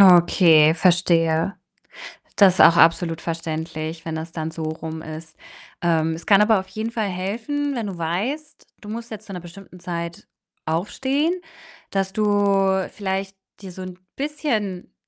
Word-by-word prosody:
Okay, 170 -4 +6
verstehe. 170 0 +2 0.8
Das 195 -3 +6
ist - - -6
auch 170 0 +7
absolut 165 0 +3
verständlich, 160 0 -4
wenn 160 - -4
das 160 +1 -5
dann 160 -1 -4
so 160 - -7
rum 160 0 -5
ist. 160 0 -9 0.5
Ähm, 165 -2 +1
es 165 - -9
kann 200 0 +6
aber 215 -2 +4
auf 190 - -8
jeden 220 +1 -4
Fall 220 -3 -1
helfen, 230 +11 -3
wenn 230 -5 -3
du 190 -3 -6
weißt, 215 - -3
du 210 - -10
musst 230 +2 -6
jetzt 215 -1 -8
zu 195 - -9
'ner 180 - -5
bestimmten 180 +1 -13
Zeit 170 -1 -6 0.4
aufstehen, 265 - 0 0.6
dass 195 -1 -1
du 200 -2 +2
vielleicht 195 -1 -3 0.3
dir 190 -2 -8
so 185 +1 -9
'n 185 -1 -8 0.2
bisschen 245 - -3
185 Hz, 155 wpm, -22 LUFS, 165-205 Hz, 0.8 s, auch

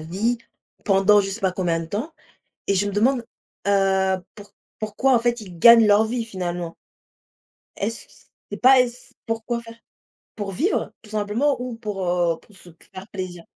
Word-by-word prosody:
vie, 200 +9 -1 0.5
pendant 200 +1 +5
je 195 0 -3
sais 215 +4 -6
pas 190 -2 +1
combien 170 -3 -1
de 165 - -6
temps 225 - -4 0.6
et 200 - +2
je 205 +2 +1
me - - -3
demande, 240 +4 +1 0.4
heu, 190 -1 +2 0.2
pou 205 - -10 0.4
pourquoi, 220 +5 +1
en - - +4
fait, 240 -1 0
ils 180 -4 -11
gagnent 230 +3 +8
leur 205 +2 +5
vie 235 +1 -2
finalement? 175 -5 -4 1.0
Est-ce 220 +2 -4
que - - -24
c - - -21 0.3
c'est 205 - -5
pas 260 +1 +7
est-c 250 0 -2
pourquoi 225 +1 -3
faire? 230 0 -13 0.6
Pour 205 -3 -4
vivre 325 - -1
tout 215 - -16
simplement 220 +6 0
ou 250 -1 -4
pour, 205 -5 -4
heu, 175 -2 +1
pour 205 - -22
se 180 -2 -15
p 165 - -21
faire 190 +3 -9
plaisir? 180 -3 -7
205 Hz, 185 wpm, -23 LUFS, 190-235 Hz, 1.0 s, gagnent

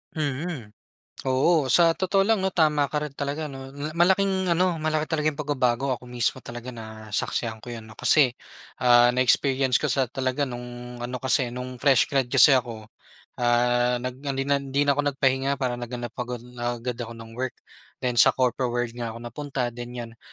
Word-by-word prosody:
Mm, 145 -6 -3 0.5
oo. 135 +3 +3
Sa 165 +5 +5
totoo 195 +3 +1
lang 220 0 +2
'no, 190 - +1
tama 155 -6 +2
ka 150 - -4
rin 150 - -7
talaga 140 +2 -3
'no, 135 -2 -8
na 150 +2 -4
malaking 190 +2 +2
ano, 175 -1 +2
malaki 155 0 0
talaga 155 -1 0
yung 150 - -2
pagbabago. 135 -3 0
Ako 125 0 -6
mismo 125 +1 -1
talaga 120 +1 -8
nasaksihan 110 0 -4
ko 120 - -11
'yan 115 -2 -7
'no, 110 - -13
kasi, 135 +3 +3 0.5
ah, 120 -1 +6
na-experience 130 +1 +3
ko - - -3
sa 135 -3 +1
talaga 130 +2 -1
nung 120 0 -8
ano, 120 +1 -5
kasi 130 -2 +1
nung 125 +1 -6
fresh 135 -1 +4
grad 135 -2 +2
kasi 140 - +7
ako, 115 -4 -4 0.5
ah, 120 0 +2
nag 125 +1 -5
hindi 135 -1 -1
na 140 0 +1
hindi 140 +1 0
na 145 - +3
ako 145 +1 0
nagpahinga. 135 0 +1
Parang 125 -3 -2
naghanap 120 -1 -5
agad 125 -1 -4 0.2
agad 120 0 -3
ako 115 -1 -6
ng 115 0 -11
work. 125 +2 -4 0.5
Then 125 -2 +1
sa - - +6
corpo 125 0 +1
world 120 -1 -2
nga 115 -1 -5
ako 115 - -9
napunta, 125 0 -3
ganiyan. 120 -1 -8
130 Hz, 185 wpm, -25 LUFS, 120-145 Hz, 0.5 s, kasi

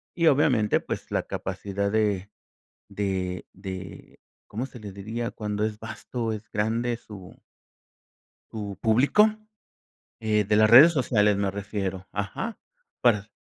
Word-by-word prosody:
y 165 -2 +2
obviamente 130 -7 +3
pues - - -5
la - - 0
capacidad 100 +1 -3
de, 105 -3 0 0.6
de 95 -3 -3
de, 95 -1 -9 0.3
¿cómo 115 +5 -4
se 125 -3 -11
le 100 -2 -8
diría? 110 +4 -4
Cuando 105 0 -2
es 110 0 -4
vasto, 115 +1 -4
es 105 -2 -6
grande 115 +3 0
su 100 -5 -12 1.1
su 105 -3 -5
público, 140 - +4 0.9
eh, 105 -1 +2
de 105 +1 +2
las 110 0 +5
redes 140 +9 +9
sociales 105 -7 +2
me 100 -1 0
refiero, 100 -2 -4
ajá, 100 - -4 0.4
para 105 -3 +2
105 Hz, 130 wpm, -26 LUFS, 100-115 Hz, 1.1 s, redes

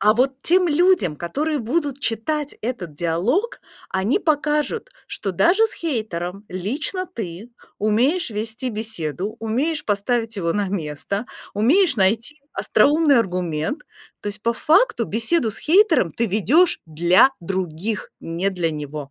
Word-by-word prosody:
А 210 +2 +5
вот 265 +3 +1
тем 360 +1 +3
людям, 300 - +3
которые 295 - -2
будут 280 +3 -2
читать 290 +6 -1
этот 215 -10 -4
диалог, 185 - 0 0.3
они 195 - +1
покажут, 300 - 0 0.2
что 195 - -4
даже 375 - +4
с - - -7
хейтером 205 - -4
лично 275 - -2
ты 220 - -7 0.3
умеешь 245 - +2
вести 220 +4 -4
беседу, 210 -4 -4
умеешь 270 +8 -1
поставить 225 +2 -1
его 170 -3 0
на 205 0 -1
место, 190 +4 -3 0.3
умеешь 280 - +3
найти 230 +9 +1
остроумный 290 -3 +3
аргумент. 180 - -2 0.4
То - - -10
есть 205 0 -7
по 235 - +2
факту 300 - +3
беседу 225 - 0
с - - -3
хейтером 320 - +3
ты 235 - 0
ведёшь 230 - +3
для 175 - +4
других, 185 +3 -3
не 170 +4 -2
для 175 -4 -1
него. 150 -2 -6
225 Hz, 135 wpm, -22 LUFS, 185-295 Hz, 0.4 s, А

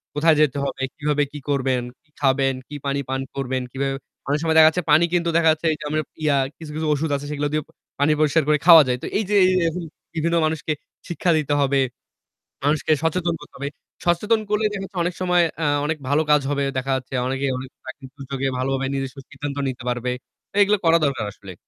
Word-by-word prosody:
কোথায় 160 +1 +4
যেতে 145 -2 +2
হবে, 135 - -4
কিভাবে 150 -1 +1
কি 150 - -7
করবেন, 130 -3 +1 0.2
কি 155 - -37
খাবেন, 135 -1 +3
কি 150 - -8
পানি 140 0 0
পান 135 0 -1
করবেন 130 -1 -2
কিভাবে 135 0 -2 0.3
অনেক 145 +2 +1
সময় 160 -1 +1
দেখা 155 0 +9
যাচ্ছে 180 +3 -3
পানি 155 +3 +6
কিন্তু 170 -1 +1
দেখা 160 -1 +4
যাচ্ছে 160 +1 -1
যে - - -8
আমরা 155 +1 0 0.2
ইয়া 145 -2 +3 0.2
কিছু, 160 -2 -9
কিছু 155 0 -2
ঔষুধ 150 +2 -1
আছে 140 - -5
সেগুলো 145 0 -1
দিয়ে 155 - 0
পা - - -23 0.3
পানি 145 +2 +3
পরিষ্কার 155 0 +3
করে 150 0 +4
খাওয়া 165 -3 +10
যায়। 125 - +1
তো - - -3
এই 215 - +1
যে 210 - +2 0.3
এ - - +3 0.5
বিভিন্ন 170 +1 0
মানুষকে 155 0 -1 0.3
শিক্ষা 175 0 0
দিতে 150 -1 0
হবে। 140 0 +2 0.9
মানুষকে 150 +1 +1
সচেতন 170 +1 0
করতে 150 - -14
হবে। 140 +1 -3 0.4
সচেতন 205 +6 +2
করলেই 210 0 +1
দেখা 195 - -4
যাচ্ছে 195 0 -9
অনেক 175 +1 -1
সময় 180 -1 +3 0.2
আ - - +2 0.2
অনেক 160 +1 -1
ভালো 145 +2 +3
কাজ 150 - +5
হবে। 140 -1 0
দেখা 130 +1 -1
যাচ্ছে 130 0 -6
অনেকে 135 +1 -1
অনেক 130 0 -7
প্রাকৃতিক 140 -4 -9
দুর্যোগে 135 0 -3
ভালোভাবে 135 +1 -1
নিজস্ব 135 0 -4
সিদ্ধান্ত 145 -1 -6
নিতে 130 -1 -5
পারবে। 125 0 -1 0.5
এগুলো 205 +1 +4
করা 165 0 +6
দরকার 135 -6 -1
আসলে। 95 -2 -11
150 Hz, 210 wpm, -22 LUFS, 135-160 Hz, 0.9 s, খাওয়া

